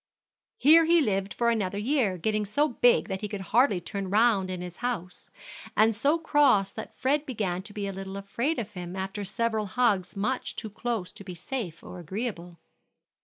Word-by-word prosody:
Here 320 +4 +7
he 340 +1 +5
lived 195 -7 0
for 235 -1 +1
another 205 -4 -1
year, 220 -4 +1
getting 215 +4 0
so 285 +10 +1
big 245 0 +3
that 190 -2 -4
he 210 - -2
could 205 -1 -5
hardly 235 -5 +4
turn 195 +2 -5
round 205 -2 +3
in 185 -1 -4
his 180 -1 -7
house, 225 -8 -4 0.5
and 220 +1 +4
so 285 +9 +2
cross 290 -11 +3
that 220 - -9
Fred 280 +3 +1
began 205 -10 -2
to 205 - -10
be 205 -1 -4
a 195 - -3
little 195 0 -6
afraid 235 +10 -2
of 220 -3 -4
him 180 -2 -7
after 195 +2 -4
several 220 +1 -1
hugs 200 -4 +1
much 235 +6 -2
too 220 -2 -6
close 220 -4 -3
to - - -12
be 180 -2 -8
safe 180 -2 -5
or 180 - -9
agreeable. 175 -1 -5
210 Hz, 190 wpm, -27 LUFS, 190-240 Hz, 0.5 s, Here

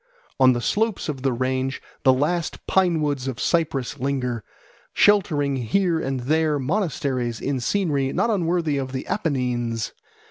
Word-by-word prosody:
On 130 -1 +6
the 120 - -2
slopes 215 - 0
of 135 -3 -4
the 135 0 +1
range 130 +2 -1 0.2
the 130 - +5
last 155 +6 -1
pine 180 -4 +2
woods 140 -3 -1
of 130 -3 -4
Cyprus 145 -5 0
linger, 125 -4 -1 0.5
sheltering 150 -9 +3
here 165 - +1
and 135 -4 -2
there 155 +3 +1
monasteries 135 - -1
in 140 -1 -1
scenery 140 -2 0
not 230 - +1
unworthy 170 -6 +1
of 130 -1 -4
the 130 - -3
Apennines. 125 - -1
140 Hz, 145 wpm, -23 LUFS, 130-165 Hz, 0.5 s, On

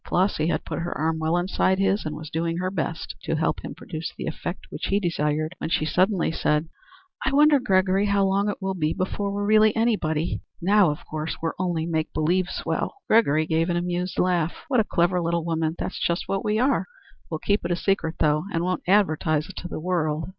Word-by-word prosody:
Flossy 180 -4 +1
had - - -1
put - - -4
her 175 +1 -3
arm 160 +1 0
well 160 +2 +1
inside 185 +1 +1
his 195 +1 +1
and 155 - -4
was 155 0 -8
doing 165 +1 -1
her 185 +1 -1
best 165 -3 -3
to 165 - -1
help 160 +1 0
him - - -6
produce 160 0 -6
the - - -4
effect 175 +3 -5
which - - -4
he 200 - +2
desired, 155 -3 -1
when - - -3
she 155 - +1
suddenly 185 +4 +2
said: 150 0 0 0.6
"I 265 - +1
wonder, 295 +1 +5
Gregory, 195 -3 +2
how 200 -1 +3
long 200 +2 +1
it 205 - -4
will 190 0 0
be 155 -4 0
before 200 +2 -2
we're 205 0 -2
really 215 0 +5
anybody. 175 -9 0 0.2
Now, 200 0 +4
of 150 - -5
course, 155 +1 -4
we're 165 0 -2
only 175 -3 0
make 160 -2 -1
believe 175 +4 +1
swell." - - -2
Gregory 155 -9 +4
gave 165 +2 +1
an 175 - +1
amused 180 0 -2
laugh. 175 -2 0
"What 255 -3 +3
a - - +4
clever 175 -1 +1
little 170 0 -1
woman! 160 -1 -1
That's - - -4
just 170 +1 0
what 195 0 -1
we 210 0 +1
are. 260 +4 +2 0.4
We'll 160 - -2
keep 205 +6 0
it 170 - -2
a 175 - +2
secret, 175 -3 0
though, 150 +2 +2
and 165 -2 0
won't 180 0 -1
advertise 155 -4 +2
it 195 - -10
to 175 - -5
the - - -5
world." 160 -2 -1
175 Hz, 220 wpm, -25 LUFS, 160-195 Hz, 0.6 s, wonder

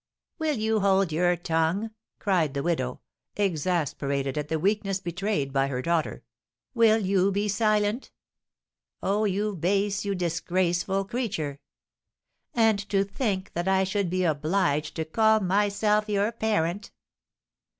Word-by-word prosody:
"Will 310 -3 0
you 220 0 +1
hold 195 -3 +2
your 175 +3 +2
tongue?" 165 +6 0 0.3
cried 170 -8 0
the 140 - -1
widow, 130 -7 -1 0.4
exasperated 150 -7 -1
at 150 -1 -2
the 160 - -1
weakness 195 +2 0
betrayed 175 -6 -2
by 135 0 +2
her 130 -2 -3
daughter. 170 -2 -1 0.5
"Will 225 -2 +5
you 195 -2 +2
be 200 +2 0
silent? 210 +2 +1 0.9
Oh, 205 +2 +1
you 205 +1 -1
base, 200 +4 0
you 200 -1 -1
disgraceful 175 +2 0
creature! 185 - -3 1.0
And 225 -3 +3
to 195 -1 +2
think 200 -2 -3
that 175 +2 -2
I 190 0 +3
should 190 -1 -1
be 185 +1 0
obliged 155 -1 0
to 160 - -2
call 220 +6 +3
myself 210 +2 +1
your 205 +1 +1
parent!" 205 -4 -1
190 Hz, 130 wpm, -26 LUFS, 165-210 Hz, 1.0 s, Will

